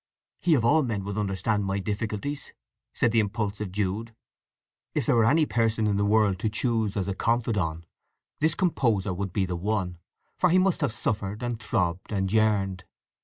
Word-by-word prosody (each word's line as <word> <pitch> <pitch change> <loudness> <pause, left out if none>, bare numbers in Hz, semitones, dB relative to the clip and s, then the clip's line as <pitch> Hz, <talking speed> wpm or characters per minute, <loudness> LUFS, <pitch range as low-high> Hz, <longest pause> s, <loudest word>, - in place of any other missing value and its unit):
"He 170 -3 +3
of 115 -4 +1
all 155 +6 +5
men 110 -8 -2
would 100 0 -4
understand 105 +1 0
my 95 0 -1
difficulties," 105 +7 -3 0.4
said 120 - +1
the 115 - +3
impulsive 105 -1 -2
Jude. 105 +3 -2 0.8
If - - 0
there - - +3
were 115 -2 +4
any 155 +2 +4
person 115 -2 +1
in 100 -1 +1
the 100 - +2
world 105 -3 +3
to 110 - 0
choose 110 -2 0
as 100 - -1
a 100 - -1
confidant, 100 -8 0 0.5
this 160 +1 +2
composer 115 - +1
would 95 +1 -3
be 95 +2 0
the 90 -1 -3
one, 90 -2 -2 0.4
for 180 - +4
he 180 - +4
must 185 -2 +2
have 145 - +1
suffered, 105 0 -2
and 120 -2 -2
throbbed, 95 -4 -1
and 95 -2 -1
yearned. 100 -4 +2
105 Hz, 180 wpm, -27 LUFS, 95-115 Hz, 0.8 s, all